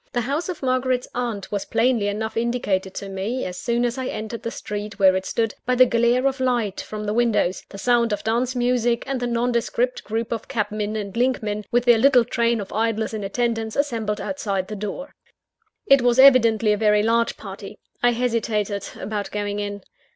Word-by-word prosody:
The 245 - +1
house 285 +9 -2
of 345 -6 -5
Margaret's 255 -1 0
aunt 235 -5 -3
was 205 -1 -1
plainly 230 -3 +1
enough 220 +2 -3
indicated 225 -5 -1
to 200 - -5
me, 195 +7 -3
as 180 - -5
soon 235 +4 0
as 240 +2 -2
I 260 - -3
entered 220 +1 -5
the - - -3
street 210 -1 -6
where 190 -2 +5
it 190 0 -2
stood, 225 -2 -1
by 250 - +2
the 255 +1 +7
glare 235 +2 +2
of 270 0 +1
light 240 -6 0
from 215 0 -6
the 210 - -1
windows, 225 -6 +1
the 200 - -10
sound 235 +2 +2
of 210 - -2
dance 240 +3 0
music, 240 -1 +1
and 270 -1 -2
the 245 - -2
nondescript 240 +1 0
group 225 +1 -3
of 230 -2 -3
cabmen 215 -3 -2
and 200 -2 -5
linkmen, 215 -4 0
with 240 0 +1
their 240 -2 +6
little 255 -1 +5
train 235 -1 +1
of 200 - -7
idlers 225 0 0
in 215 -2 -4
attendance, 225 +1 -1
assembled 225 -7 -1
outside 200 -9 -3
the 215 - -4
door. 210 +8 -6 0.7
It 275 -1 +6
was 245 0 +2
evidently 230 -5 +6
a - - 0
very 210 -1 +3
large 230 +1 +1
party. - - -9 0.2
I 245 0 +4
hesitated 225 -4 -1
about 205 -1 -4
going 205 0 -3
in. 205 -1 -5
230 Hz, 195 wpm, -23 LUFS, 210-245 Hz, 0.7 s, the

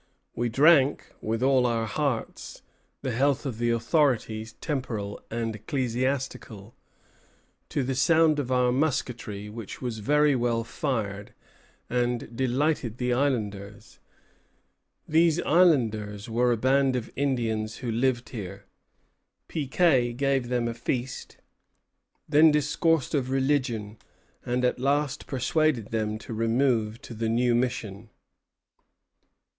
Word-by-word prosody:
We 120 0 -1
drank, 140 +2 +4
with 115 +2 -2
all 130 -2 +4
our 115 -1 0
hearts, 130 +1 -3 0.4
the 130 - -1
health 140 +4 +1
of 120 -5 -4
the 120 0 +1
authorities, 115 -2 0
temporal 115 -9 -4
and 115 -1 -3
ecclesiastical, 125 -3 -3 0.9
to 140 - -1
the 135 +1 -1
sound 155 +3 +3
of 130 -3 -3
our 125 -1 +3
musketry, 125 -7 -2
which 110 0 -8
was 120 -4 -4
very 150 +5 +3
well 120 -2 0
fired, 110 -6 -3 0.5
and 120 -1 -2
delighted 130 -1 0
the 125 0 0
islanders." 105 -6 -3 1.1
These 165 +1 +3
islanders 110 - +2
were 120 +2 +2
a 120 - +1
band 130 +2 +2
of 120 -2 -4
Indians 115 -6 -1
who 120 - -1
lived 120 +1 0
here. 100 -5 -7 0.8
Piquet 135 -4 +2
gave 135 0 0
them 120 -1 0
a 115 - -2
feast, 125 +2 -4 0.9
then 155 +2 +6
discoursed 150 +1 +1
of 135 -4 0
religion, 130 -6 -1 0.4
and 125 +1 0
at 125 - 0
last 140 +2 0
persuaded 135 -3 0
them 110 -1 -1
to 115 - -8
remove 115 -1 +1
to - - -9
the 115 0 -2
new 120 +1 +2
mission. 115 -4 -2
125 Hz, 120 wpm, -26 LUFS, 115-140 Hz, 1.1 s, then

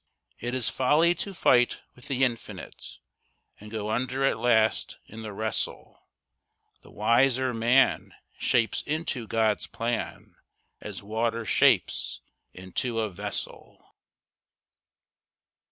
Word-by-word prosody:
It 120 +2 -3
is 125 -3 +1
folly 150 +6 +3
to 200 - -3
fight 125 -9 +3
with 125 - -14
the 135 -2 +1
Infinite, 120 -3 -4 0.6
And 105 - -11
go 105 -1 -3
under 130 +4 0
at 135 - +1
last 110 -2 +2
in 110 +1 -10
the 110 -1 -6
wrestle. 110 +2 -3 0.7
The - - -17
wiser 125 +4 +2
man 120 +4 +2 0.2
shapes 115 -2 +2
into 150 -6 -3
God's 110 -2 +1
plan, 115 0 -4 0.4
As 105 -2 -8
water 115 +2 -1
shapes - - +2 0.3
into 105 +6 -3
a 110 -2 -1
vessel. 90 - -6
115 Hz, 110 wpm, -27 LUFS, 110-130 Hz, 0.7 s, folly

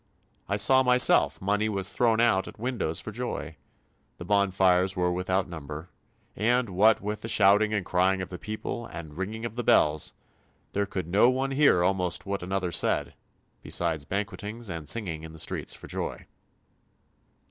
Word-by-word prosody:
I 100 - +1
saw 130 +6 +5
myself 125 -1 +4
money 105 +3 0
was 100 -2 -3
thrown 115 -2 +2
out 115 -5 +3
at - - -11
windows 115 -9 -2
for 110 - -6
joy. 100 - -5 0.6
The 85 - -8
bonfires 95 -1 +2
were 90 -1 +1
without 90 +2 -1
number, 80 -1 -8 0.4
and, 120 +2 +1
what 105 +5 +4
with 105 +2 -4
shouting 105 0 +4
and 105 -4 -1
crying 95 +1 +2
of 95 - -5
the 90 - -8
people 110 +2 -5
and 75 -3 -9
ringing 105 +6 -4
of 115 -1 -6
the 120 - -2
bells, 75 -7 +3 0.6
there 100 0 0
could 95 -4 -4
no 100 +7 +4
one 135 +1 -1
hear 135 -11 +4
almost 90 -3 0
what 100 -1 -3
another 90 0 -2
said, - - +1 0.5
besides 80 -4 -1
banquetings 105 +4 -5
and 80 -3 -6
singing 90 -9 -1
in 80 0 -10
the - - -11
street - - -3
for - - -5
joy." - - -5
100 Hz, 165 wpm, -27 LUFS, 90-110 Hz, 0.6 s, saw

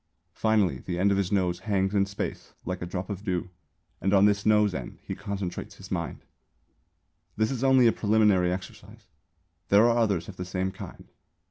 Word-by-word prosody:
Finally 110 -4 +1
the 90 -2 -4
end 100 +3 +3
of 100 - +2
his 95 -2 -1
nose 90 -3 +1
hangs 95 -1 0
in 100 -1 +2
space 100 - -5
like 90 0 -4
a 90 - -4
drop 90 +1 -4
of 100 -1 -6
dew 90 -3 -2 0.5
and 95 +1 +2
on 100 +1 +6
this 105 0 +2
nose 105 -2 +4
end 65 -6 -6
he - - -5
concentrates 100 -3 -5
his - - -13
mind. - - -4 1.1
This 110 +2 +1
is 130 -1 -3
only 130 -2 +5
a 115 - +6
preliminary 105 -5 +3
exercise. 90 +1 -8 0.6
There 105 +4 +6
are 115 - +3
others 100 -7 +1
of 95 - -10
the 90 - -4
same 95 +1 -2
kind. - - -10
100 Hz, 190 wpm, -27 LUFS, 90-105 Hz, 1.1 s, on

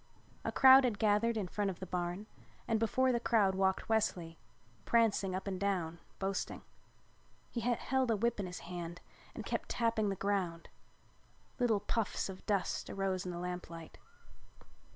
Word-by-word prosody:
A - - -1
crowd 265 0 +8
had 235 -5 +1
gathered 220 +2 +2
in 200 -4 -1
front 205 +2 -1
of 185 - -6
the 190 - -5
barn 180 +2 -3 0.4
and 225 -2 +2
before 255 +4 +2
the 240 - +1
crowd 210 -5 +3
walked 190 0 +1
Wesley, 175 -7 0 0.4
prancing 205 - +2
up 190 - -4
and 190 -2 -3
down 180 -4 -1 0.2
boasting. 195 0 -3 0.9
He 240 - -2
held 245 +2 0
a 225 - +3
whip 235 +2 0
in 195 - -2
his 180 - -7
hand 175 0 -6 0.4
and - - -6
kept - - -3
tapping 225 -3 +1
the 195 - -1
ground. 185 -4 -2 0.9
Little 225 -5 +2
puffs 220 -3 -1
of 190 -1 -8
dust 200 -3 0
arose 190 -2 -2
in - - -2
the 175 - -5
lamplight. 175 -2 -6
200 Hz, 160 wpm, -34 LUFS, 180-225 Hz, 0.9 s, crowd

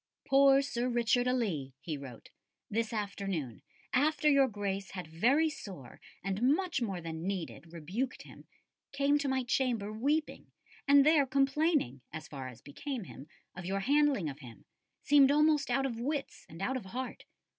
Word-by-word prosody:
"Poor 275 0 +6
Sir 250 -2 -2
Richard 240 +1 +2
a 250 - +2
Lee," 155 - -2
he 160 - -4
wrote, 135 -5 -10 0.4
"this 225 +1 -1
afternoon, 195 - -4 0.3
after 300 +3 +2
your 280 -2 +5
Grace 200 -3 -3
had 180 -2 -5
very 240 - +2
sore, 185 - -9 0.2
and 195 +2 -2
much 300 +4 +2
more 195 -6 -2
than 165 +1 -5
needed, 175 -3 -5
rebuked 185 - -4
him, - - -14 0.5
came 280 +1 +2
to 285 - -2
my 265 -1 0
chamber 240 -4 0
weeping, 290 +8 -1 0.4
and 280 0 +7
there 300 -3 +5
complaining, 275 - +1
as 155 0 -7
far 135 -3 -7
as 125 -3 -12
became 245 - -5
him, 145 -5 -11 0.3
of 180 - -7
your 195 +2 -2
handling 280 - +2
of 140 0 -6
him, 120 -5 -13 0.4
seemed 280 -2 +6
almost 300 -1 +3
out 270 +2 +1
of 235 -4 -3
wits 280 +3 -4
and 165 +4 -8
out 260 +5 0
of 235 - -8
heart. 250 +7 -6
235 Hz, 165 wpm, -32 LUFS, 180-275 Hz, 0.5 s, and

